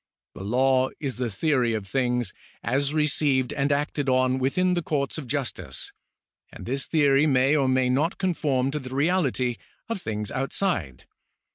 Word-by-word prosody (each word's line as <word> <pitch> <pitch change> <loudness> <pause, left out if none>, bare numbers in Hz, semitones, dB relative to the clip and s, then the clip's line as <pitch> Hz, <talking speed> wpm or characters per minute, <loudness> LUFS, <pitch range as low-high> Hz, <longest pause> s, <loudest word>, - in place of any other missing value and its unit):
The - - -8
law 130 +4 +2
is 135 -5 -3
the 125 -2 -1
theory 125 -1 +1
of 105 -3 -4
things, 125 +1 0 0.3
as 140 +2 0
received 150 -3 +1
and 140 0 0
acted 145 -1 0
on 130 0 +2
within 180 +8 +1
the 175 - 0
courts 150 -1 -2
of 140 - -8
justice, 120 - -3 0.6
and - - -10
this 135 +3 -2
theory 145 -2 +4
may 135 +1 +3
or 140 -3 +2
may 130 0 +2
not 145 +8 +1
conform 145 -8 0
to 150 - -2
the 130 -1 -7
reality 140 -6 +1 0.3
of 230 -5 -3
things 105 -4 -4
outside. 130 - -2
135 Hz, 160 wpm, -25 LUFS, 125-150 Hz, 0.6 s, theory